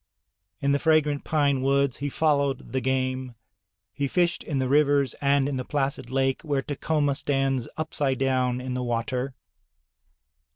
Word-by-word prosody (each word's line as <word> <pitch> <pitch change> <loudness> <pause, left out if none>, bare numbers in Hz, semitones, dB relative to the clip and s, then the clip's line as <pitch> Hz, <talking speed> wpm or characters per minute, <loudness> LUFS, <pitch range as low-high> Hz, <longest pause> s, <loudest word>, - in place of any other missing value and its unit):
In 140 - +2
the 140 - +2
fragrant 150 -3 +2
pine 140 -4 +1
woods 140 -1 +2
he 145 +1 -3
followed 140 -3 0
the 130 - -1
game; 130 -1 -1 0.6
he 140 -1 -1
fished 175 +3 +1
in 145 - -3
the 130 -1 0
rivers 140 -1 +3
and 140 -1 +3
in 140 -2 -2
the 130 - -2
placid 135 -3 -2
lake 135 0 0
where 140 -4 -1
Tacoma 145 0 0
stands 135 -3 0
upside 150 -4 -1
down 130 -2 +1
in 125 0 -4
the 125 - -2
water. 125 +2 -2
135 Hz, 155 wpm, -26 LUFS, 130-145 Hz, 0.6 s, rivers